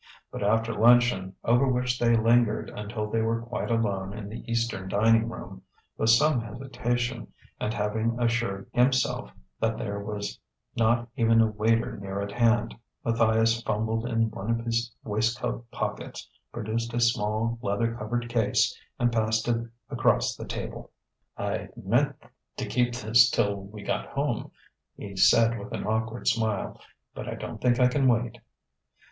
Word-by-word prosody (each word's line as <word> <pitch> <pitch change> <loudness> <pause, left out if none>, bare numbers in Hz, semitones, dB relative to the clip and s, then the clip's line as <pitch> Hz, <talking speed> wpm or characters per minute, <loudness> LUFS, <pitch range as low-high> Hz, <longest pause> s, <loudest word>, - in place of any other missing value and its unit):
But - - -6
after 115 +3 +1
luncheon 115 -4 +4
over 120 +4 +3
which 125 -1 0
they 120 -1 +4
lingered 115 0 +2
until 105 +1 -4
they 110 +1 0
were 115 +1 0
quite 120 +1 -4
alone 100 -4 -1
in 105 -2 -6
the 110 - -7
eastern 115 -5 -1
dining 115 +3 +3
room - - -9 0.3
with 110 - +1
some 125 +3 +5
hesitation, 120 0 -3 0.3
and 105 - -1
having 110 +2 -1
assured 115 -5 0
himself 130 +1 +2 0.3
that 110 0 0
there 100 -2 -3
was 100 0 -5 0.4
not 115 +1 +2
even 115 -1 +4
a 115 - +6
waiter 115 +2 0
near 100 0 -5
at 100 0 -3
hand, 120 +1 +2 0.3
Matthias 115 0 +3
fumbled 110 +1 -1
in 115 -2 +1
one 100 +2 -6
of 115 0 0
his 115 0 0
waistcoat 115 +2 -2
pockets, - - -5 0.2
produced 115 +1 -3
a - - +1
small 115 0 +1
leather 115 +2 0
covered 120 +1 -3
case, 115 0 +2 0.2
and 120 -2 +2
passed 110 0 +1
it 115 -1 0 0.2
across - - +2
the - - -8
table. - - -6 0.5
"I'd - - -4
meant - - +1 0.4
to - - -2
keep 120 -1 0
this 115 0 +5
till 100 -2 +1
we 105 +1 -10
got - - -2
home," - - -2 0.5
he 100 -1 -8
said 115 +4 +5
with 100 - -9
an - - -3
awkward 110 +2 -2
smile. 110 -4 0 0.3
"But - - -6
I - - -4
don't - - -7
think 120 -1 +3
I 125 - +6
can 135 +1 +2
wait...." 120 -1 +1
115 Hz, 155 wpm, -27 LUFS, 110-120 Hz, 0.5 s, a